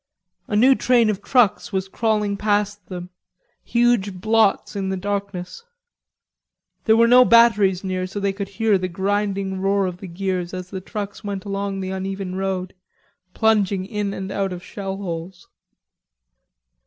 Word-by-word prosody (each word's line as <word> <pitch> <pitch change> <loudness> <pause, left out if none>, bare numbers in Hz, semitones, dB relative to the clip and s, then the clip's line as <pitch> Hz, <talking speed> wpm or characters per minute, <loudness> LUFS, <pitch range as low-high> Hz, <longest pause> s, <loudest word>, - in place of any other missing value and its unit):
A 210 - -2
new 255 +6 +6
train 240 -4 +3
of 200 -1 -5
trucks 240 -3 +2
was 190 -1 -2
crawling 210 -1 0
past 205 -2 -1
them, 180 -1 -7 0.5
huge 235 -5 +2
blots 220 +2 +2
in 195 -1 -2
the 190 - -2
darkness. 200 - -4 1.2
There 220 -1 +5
were 230 0 +5
no 250 +1 +8
batteries 215 -6 +4
near, 185 -1 -2
so 190 +2 -5
they 200 -1 0
could 195 0 -5
hear 205 0 +1
the 185 - -2
grinding 195 +1 -1
roar 195 0 +2
of 180 -1 -4
the 195 - -9
gears 185 0 -3
as 185 0 -7
the 190 -2 -5
trucks 205 +2 -6
went 200 -1 -5
along 200 -1 -3
the 190 0 -4
uneven 190 0 -4
road, 190 -1 -3 0.6
plunging 205 -4 +2
in 205 -1 -3
and 190 -1 -5
out 195 -1 -1
of 180 0 -7
shellholes. 190 -3 -6
195 Hz, 155 wpm, -22 LUFS, 190-210 Hz, 1.2 s, no